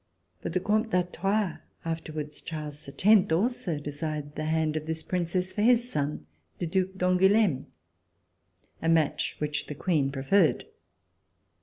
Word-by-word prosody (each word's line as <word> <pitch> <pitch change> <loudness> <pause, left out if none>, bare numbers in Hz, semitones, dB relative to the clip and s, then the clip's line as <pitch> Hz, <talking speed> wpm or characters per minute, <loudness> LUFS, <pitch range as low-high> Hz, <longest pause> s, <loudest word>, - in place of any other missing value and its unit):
But - - -4
the 185 - +2
Comte 215 +4 +1
d'Artois, 185 0 0 0.3
afterwards 155 -2 -4
Charles 150 -3 -7
X, 205 +5 +4
also 185 -2 0
desired 145 0 -4
the 155 - -4
hand 160 -1 +1
of 155 0 -3
this 160 0 -1
Princess 180 +1 -1
for 210 - -1
his 245 +2 +4
son, 145 - -2 0.3
the - - -2
Due 185 +2 +1
d'Angouleme, 185 -3 +3 1.1
a 165 - +1
match 155 -2 +2
which 150 0 -2
the 150 - -5
Queen 145 -4 +1
pre 135 -1 -5
ferred. 175 +2 +3
165 Hz, 140 wpm, -28 LUFS, 150-190 Hz, 1.1 s, X